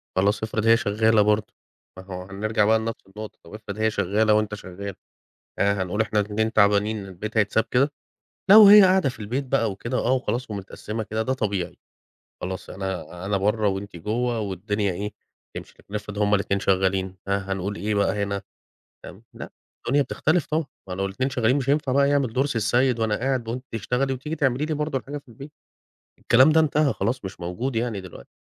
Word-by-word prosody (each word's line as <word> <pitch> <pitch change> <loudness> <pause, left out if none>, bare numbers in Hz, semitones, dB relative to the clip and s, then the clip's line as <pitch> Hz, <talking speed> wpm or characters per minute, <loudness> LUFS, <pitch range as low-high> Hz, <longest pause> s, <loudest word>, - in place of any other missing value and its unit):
خلاص، 100 +3 +1
افرض 110 0 -2
هي 115 0 +7
شغالة 110 -1 +2
برضه؟ 105 0 +1 0.4
ما 95 - -9
هو 90 -1 -7
هنرجع 105 +2 0
بقى 110 +1 +4
لنفْس 115 +1 -4
النقطة، 105 +2 -9
طب - - -15
افرض 105 -1 -7
هي 110 0 +1
شغالة 105 +2 +2
وأنت 105 -1 +1
شغال؟ 100 0 -8 0.6
آآ، 100 -1 +2
هنقول 95 +4 -3
إحنا 105 -1 0
الإتنين 110 +2 -1
تعبانين 105 0 +2
البيت 105 +4 -7
هيتساب 110 +1 +2
كده! 140 +4 +2 0.6
لو 210 +1 +10
هي 210 0 +10
قاعدة 185 -6 +4
في 120 - -8
البيت 120 +7 -2
بقى 120 -4 +1
وكده 115 +6 -3
آه 125 - +1
وخلاص 125 -2 -1
ومتقسمة 105 +2 -5
كده 110 +1 -2
ده 130 - -1
طبيعي. 100 -8 -2 0.7
خلاص 95 +1 -5
أنا 90 -2 -5
أنا 100 0 +1
بره 105 +2 +1
وأنتِ 95 -1 -4
جوه 115 +6 -1
والدنيا 100 0 -2
إيه، 100 +3 -4 0.4
تمشي. - - -8
لكن 100 - -14
افرض 105 0 -5
هُم 105 0 +3
الاتنين 100 0 0
شغالين، 95 0 0
ها 100 0 -1
هنقول 95 +2 -3
إيه 105 +1 -2
بقى 100 0 +1
هنا، 100 0 -2 0.6
فاهم؟ 100 +5 -11
لأ - - -9 0.4
الدنيا 140 +4 +3
بتختلف 155 +3 0
طبعًا، 155 0 -1 0.2
ما 90 - -5
لو 95 +1 -2
الاتنين 130 +8 -2
شغالين 125 0 +1
مش 135 -1 -2
هينفع 145 -2 +1
بقى 140 +1 +3
يعمل 140 -5 +1
دور 135 +2 +2
سي 135 -5 -2
السيد 120 +3 +2
وأنا 110 -2 +1
قاعد 130 -2 -1
وأنتِ 125 +3 -4
تشتغلي 125 +5 -1
وتيجي 145 +5 -5
تعملي 135 -1 +1
لي 155 - -2
برضه 150 -2 -1
الحاجة 140 +3 -6
في 145 -1 -14
البيت، 135 +6 -11 0.7
الكلام 130 +6 +5
ده 160 - +5
انتهى 150 -2 +2
خلاص، 115 +3 -2
مش 95 0 -7
موجود 115 +9 -3
يعني 115 -3 -1
دلوقتي. 90 -9 -12
110 Hz, 195 wpm, -24 LUFS, 100-125 Hz, 0.7 s, لو